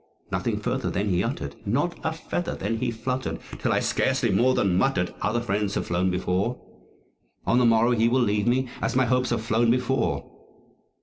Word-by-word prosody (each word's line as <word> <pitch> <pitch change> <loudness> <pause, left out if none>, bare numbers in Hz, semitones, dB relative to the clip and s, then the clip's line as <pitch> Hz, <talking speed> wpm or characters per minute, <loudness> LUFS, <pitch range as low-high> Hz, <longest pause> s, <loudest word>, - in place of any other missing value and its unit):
Nothing - - -1
further - - -1
then 100 +2 -1
he 90 -2 +1
uttered; 70 0 -4
not 145 - 0
a 160 - 0
feather 160 +2 -3
then 110 +4 -2
he 125 +2 -1
fluttered 125 +3 -3 0.2
Till - - 0
I - - +2
scarcely - - +1
more 125 +7 +3
than 95 -3 +2
muttered, 90 -4 +1
"Other 120 +1 0
friends 105 -3 -1
have - - -1
flown 90 +2 +1
before 95 +6 -1 0.9
On 120 - +3
the 125 - +4
morrow 115 +1 +4
he 115 -1 +3
will 130 +2 +2
leave 105 -2 +1
me, 130 +2 +2
as 115 +1 -1
my 130 0 +4
Hopes 125 +1 +1
have - - -1
flown 115 +1 +2
before." 125 +2 +1
115 Hz, 190 wpm, -25 LUFS, 100-125 Hz, 0.9 s, the